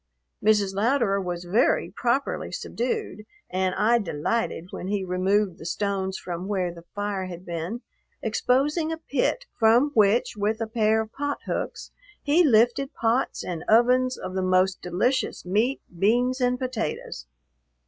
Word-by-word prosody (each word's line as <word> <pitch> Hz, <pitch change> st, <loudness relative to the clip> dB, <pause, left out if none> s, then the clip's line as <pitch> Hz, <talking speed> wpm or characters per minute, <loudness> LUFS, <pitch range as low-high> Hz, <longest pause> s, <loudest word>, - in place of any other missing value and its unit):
Mrs. 205 Hz, -2 st, +3 dB
Louderer 210 Hz, -1 st, +1 dB
was 175 Hz, -1 st, -4 dB
very 205 Hz, +8 st, +2 dB
properly 250 Hz, +3 st, -1 dB
subdued 230 Hz, -4 st, -3 dB, 0.3 s
and 185 Hz, 0 st, 0 dB
I 235 Hz, +3 st, +3 dB
delighted 185 Hz, +1 st, -2 dB
when 180 Hz, -, -6 dB
he 200 Hz, -1 st, -1 dB
removed 185 Hz, +1 st, +1 dB
the -, -, -10 dB
stones 190 Hz, 0 st, -2 dB
from 175 Hz, +1 st, -5 dB
where 185 Hz, -4 st, -1 dB
the 170 Hz, 0 st, -13 dB
fire 205 Hz, -2 st, -2 dB
had 180 Hz, 0 st, -9 dB
been, 175 Hz, +8 st, -4 dB, 0.4 s
exposing 280 Hz, +8 st, +1 dB
a 325 Hz, -, -3 dB
pit 325 Hz, -, -1 dB
from 235 Hz, +6 st, +5 dB
which, 215 Hz, +1 st, +3 dB
with 210 Hz, +2 st, -1 dB
a 225 Hz, -, -1 dB
pair 220 Hz, -1 st, +2 dB
of 220 Hz, 0 st, -7 dB
pot 285 Hz, 0 st, -3 dB
hooks, -, -, -4 dB, 0.3 s
he 310 Hz, +5 st, +4 dB
lifted 245 Hz, +1 st, +3 dB
pots 230 Hz, +3 st, 0 dB
and 170 Hz, -3 st, -5 dB
ovens 250 Hz, +3 st, +4 dB
of 185 Hz, -, -6 dB
the 190 Hz, -, -1 dB
most 185 Hz, 0 st, +2 dB
delicious 185 Hz, +10 st, -1 dB
meat, 220 Hz, +9 st, +1 dB, 0.2 s
beans, 245 Hz, +6 st, +2 dB
and 250 Hz, 0 st, +2 dB
potatoes. 230 Hz, -, -4 dB
215 Hz, 150 wpm, -25 LUFS, 185-245 Hz, 0.4 s, from